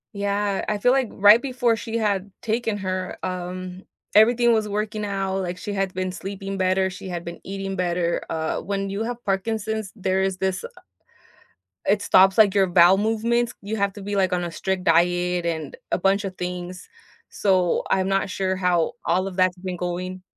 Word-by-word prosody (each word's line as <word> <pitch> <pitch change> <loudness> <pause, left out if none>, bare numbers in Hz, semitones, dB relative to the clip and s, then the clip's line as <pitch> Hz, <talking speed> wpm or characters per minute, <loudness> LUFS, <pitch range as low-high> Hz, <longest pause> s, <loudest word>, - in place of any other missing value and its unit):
Yeah, 200 0 -1
I 210 - 0
feel 245 +5 +3
like 265 -4 +2
right 205 +4 +6
before 250 -3 +1
she 225 +1 -4
had 200 -3 -1
taken 225 -1 -1
her, 185 -1 -3
um, 185 0 -5 0.3
everything 235 +2 +5
was 215 -2 0
working 210 +1 -2
out, 195 -1 -2
like 180 -1 -4
she 205 +2 -5
had 195 -1 -1
been 185 0 -2
sleeping 195 +1 -6
better, 190 0 +1
she 190 +1 -8
had 175 -1 -5
been 170 0 -7
eating 195 0 -5
better, 175 -2 0
uh, 160 -1 -2
when 195 0 -3
you 200 +2 -3
have 240 +1 -5
Parkinson's, 215 +1 -2
there 190 -1 0
is 190 -1 0
this, 190 0 -1
uh - - -4 1.2
It 205 0 +2
stops 190 +2 +5
like 205 -3 +5
your 195 -2 +4
bowel 175 +1 +6
movements. 230 +3 0
You 205 +2 -4
have 200 -1 +1
to 205 - -10
be 205 +1 -4
like 190 -2 +2
on 175 -1 0
a 170 - -4
strict 190 +1 -2
diet 175 +1 +2
and 160 -3 -3 0.2
a - - +2
bunch 195 +3 +2
of 190 -2 -6
things, 180 0 -5 0.4
so 185 -3 +1
I'm 190 0 +2
not 195 0 0
sure 190 0 -1
how 180 -3 +1
all 185 +3 +1
of 190 - -7
that's 185 -1 +2
been 185 0 -5
going. 180 +1 -4
190 Hz, 190 wpm, -23 LUFS, 185-205 Hz, 1.2 s, right